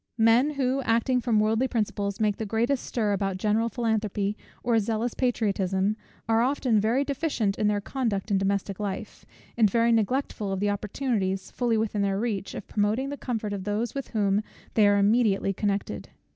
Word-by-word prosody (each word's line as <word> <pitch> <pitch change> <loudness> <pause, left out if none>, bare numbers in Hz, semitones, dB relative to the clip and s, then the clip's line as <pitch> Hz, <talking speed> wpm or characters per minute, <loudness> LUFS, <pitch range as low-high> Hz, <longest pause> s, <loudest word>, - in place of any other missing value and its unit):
Men 235 +6 +4
who, 265 0 +1
acting 245 +1 +1
from 230 -3 +2
worldly 220 +4 +2
principles, 205 -4 -2
make 210 -2 +1
the - - -3
greatest 235 +5 0
stir 215 -4 0
about 195 -1 -1
general 215 +4 +1
philanthropy 215 -3 -1 0.3
or 235 -2 +3
zealous 225 +2 -1
patriotism, 200 -5 0 0.3
are 225 0 +3
often 250 -3 +2
very 230 +6 +2
deficient 275 -8 -1
in 210 - +2
their 205 -1 +1
conduct 225 -4 -2
in 195 - +3
domestic 200 0 -1
life; 200 -2 -5 0.3
and 220 -3 +4
very 230 +3 +3
neglectful 225 -2 0
of 195 - -2
the 205 +1 +1
opportunities, 205 -2 -2
fully 240 -3 0
within 215 -1 -1
their 195 -1 0
reach, 210 -4 -2
of - - -7
promoting 215 +6 0
the 285 - -4
comfort 225 -6 -3
of 195 -2 -4
those 210 +3 -2
with 275 -1 -4
whom 205 -2 +1 0.3
they 215 -2 +5
are 205 0 +4
immediately 200 -1 +3
connected. 200 0 -2
215 Hz, 175 wpm, -26 LUFS, 200-240 Hz, 0.3 s, they